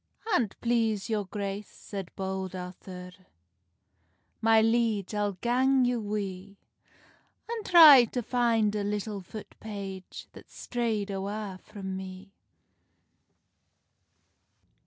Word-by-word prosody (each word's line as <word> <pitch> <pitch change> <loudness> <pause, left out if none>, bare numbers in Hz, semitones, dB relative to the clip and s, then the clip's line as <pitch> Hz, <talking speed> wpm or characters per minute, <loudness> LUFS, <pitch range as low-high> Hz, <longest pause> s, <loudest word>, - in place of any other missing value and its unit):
"An't 230 - 0
please 225 -3 0
your 210 -2 0
grace," 200 +1 -4
said 195 -4 -8
Bold 190 -1 -4
Arthur, 180 0 -8 1.3
"My 225 0 +5
liege, 225 -3 +1
I'll 205 -1 0
gang 255 +6 +2
you 245 -1 0
wi, 200 -2 -5 0.9
An 460 -1 -4
try 310 -10 +9
to 245 +2 -4
fin 230 -3 +2
a 205 - -1
little 205 0 -3
foot 210 +4 -10
page, 195 -3 -7
That's - - -15
strayd 225 -4 -1
awa 195 0 -4
frae 210 -2 -11
me." 190 +1 -6
210 Hz, 105 wpm, -28 LUFS, 195-230 Hz, 1.3 s, try